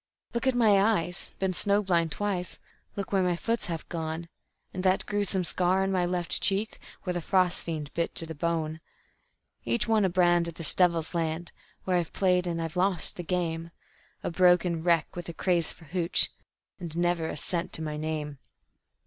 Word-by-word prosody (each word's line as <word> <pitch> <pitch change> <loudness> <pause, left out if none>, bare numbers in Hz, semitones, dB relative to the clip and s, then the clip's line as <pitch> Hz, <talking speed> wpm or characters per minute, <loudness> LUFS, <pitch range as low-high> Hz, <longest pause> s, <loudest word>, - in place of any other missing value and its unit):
"Look 235 +2 -1
at 260 - +3
my 215 -5 +5
eyes 195 -4 +1
been 190 -1 0
snow 205 +3 +2
blind 170 -4 +1
twice; 195 -2 -1 0.4
look 200 -1 -4
where 195 -1 +3
my 180 -1 +1
foot's 230 +6 -2
half 165 -3 -5
gone; 165 0 -4 0.4
And 185 - -3
that 185 0 +2
gruesome 200 -2 0
scar 180 +2 +1
on 195 - 0
my 180 -2 +1
left 175 -1 -1
cheek, 200 +2 0 0.2
where 180 - -2
the 175 - -2
frost 185 0 +1
fiend 155 -3 -5
bit 170 0 -2
to 165 - +3
the 160 - -6
bone. 160 0 -2 0.8
Each 235 -1 0
one 220 -2 +3
a 190 - +3
brand 175 -1 +3
of 170 - -7
this 165 -4 +5
devil's 170 -3 +2
land, 165 0 -2 0.3
where 185 -1 +1
I've 170 -2 -2
played 180 -2 +2
and 170 -1 -2
I've 165 -1 -4
lost 180 -2 +2
the - - -5
game, 170 -2 -2 0.5
A - - -2
broken 175 -1 +3
wreck 165 -1 +1
with 175 -1 -6
a - - -5
craze 170 -1 +1
for 165 - -15
`hooch', 175 +2 +2 0.5
and 170 -2 -5
never 175 -2 +1
a - - -5
cent 170 +2 -2
to 160 - 0
my 155 -1 -3
name. 150 -2 -4
175 Hz, 190 wpm, -28 LUFS, 165-190 Hz, 0.8 s, my